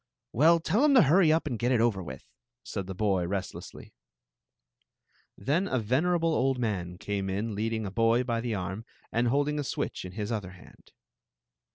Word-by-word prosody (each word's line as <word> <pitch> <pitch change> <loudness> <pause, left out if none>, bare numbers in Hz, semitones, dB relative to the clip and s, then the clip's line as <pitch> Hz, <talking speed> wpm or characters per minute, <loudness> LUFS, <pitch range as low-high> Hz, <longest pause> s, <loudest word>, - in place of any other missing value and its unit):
"Well, 165 +7 +5
tell 205 - +1
*em 295 -2 +5
to 250 - +8
hurry 160 +3 +5
up 160 +1 +2
and 125 -7 -3
get 120 +2 +1
it 125 - +3
over 110 -4 +1
with, 85 - -9 0.4
said 100 -3 -5
the 95 - -6
boy, 95 -3 0
restlessly. 95 0 -6 1.4
Then 165 +9 0
a 130 - 0
venerable 160 +9 +1
old 135 -2 +1
man 95 -7 -3
came 100 0 -3
in 105 +4 -2
leading 110 +1 -2
a 95 - -5
boy 115 +3 +2
by 115 -2 -1
the 120 -2 -2
arm 95 +3 -4 0.3
and 120 +1 +1
holding 145 +4 +1
a - - -1
switch - - -3
in 90 0 -8
his 105 +2 -4
other 100 -5 -4
hand. 95 - -18
115 Hz, 185 wpm, -28 LUFS, 100-145 Hz, 1.4 s, to